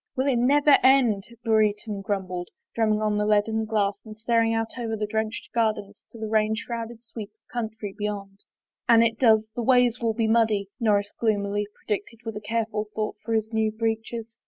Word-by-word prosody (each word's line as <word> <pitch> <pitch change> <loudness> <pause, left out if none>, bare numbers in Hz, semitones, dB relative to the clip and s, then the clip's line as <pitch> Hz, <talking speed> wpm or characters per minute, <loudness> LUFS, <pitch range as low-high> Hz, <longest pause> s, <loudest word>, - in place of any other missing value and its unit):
" - - -66
Will 260 - 0
it 265 -4 +2
never 285 +4 +4
have - - +6
done? 255 -6 +4
" 235 0 -18
Brereton 215 -2 +1
grumbled, 185 -3 -3 0.2
drum 225 -1 +1
ming 215 0 +1
on 210 -1 +1
the 210 - +1
leaded 220 +1 +2
glass 205 -2 0
and* 215 -1 -11
staring 230 0 +2
out 225 +2 -2
over 225 -2 -2
the 210 - -1
drenched 220 +1 -3
gardens 215 -3 -1
to - - -13
the 220 -1 -4
rain 215 0 +2
shrouded 230 0 -6
sweep 220 -3 -8
of 215 +1 -29
country 220 -4 -4
beyond. 200 -2 -5 0.3
" - - -40
An 230 -1 +7
it 225 -1 0
does, 220 -3 +4
the 240 - -2
ways 245 0 +3
will 230 -2 0
be 225 -1 +1
muddy," 220 -3 +2
Norris 205 -3 +1
gloom 215 -3 +1
ily 205 +1 -2
predicted 215 +2 -4
with 225 -1 -4
a 210 - -5
careful 220 0 -2
thought 215 -1 -2
for 225 0 -1
his 220 +1 -1
new 220 -1 +1
breeches. 225 +1 -3
220 Hz, 210 wpm, -25 LUFS, 210-230 Hz, 0.3 s, An